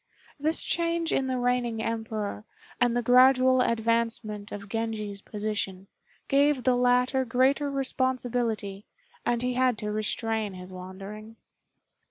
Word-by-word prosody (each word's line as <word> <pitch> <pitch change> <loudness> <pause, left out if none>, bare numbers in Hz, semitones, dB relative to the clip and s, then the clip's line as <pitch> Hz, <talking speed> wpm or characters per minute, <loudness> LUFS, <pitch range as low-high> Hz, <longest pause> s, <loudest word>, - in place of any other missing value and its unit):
This 310 +3 0
change 335 -1 0
in 265 - +1
the 260 -1 -1
reigning 245 -2 0
Emperor, 220 -2 -3 0.4
and 245 -1 +2
the 245 - 0
gradual 255 +1 +6
advancement 230 -2 0
of 200 0 -7
Genji's 215 -2 -3
position, 205 -3 -3 0.4
gave 280 -1 +3
the 255 -1 +3
latter 250 +1 +3
greater 260 +4 +2
responsibility, 245 -6 -2 0.4
and 240 0 +1
he 250 0 0
had 255 -2 +2
to 210 -1 -3
restrain 215 -1 -1
his 185 0 -9
wandering. 195 +4 -9
235 Hz, 125 wpm, -27 LUFS, 215-255 Hz, 0.4 s, gradual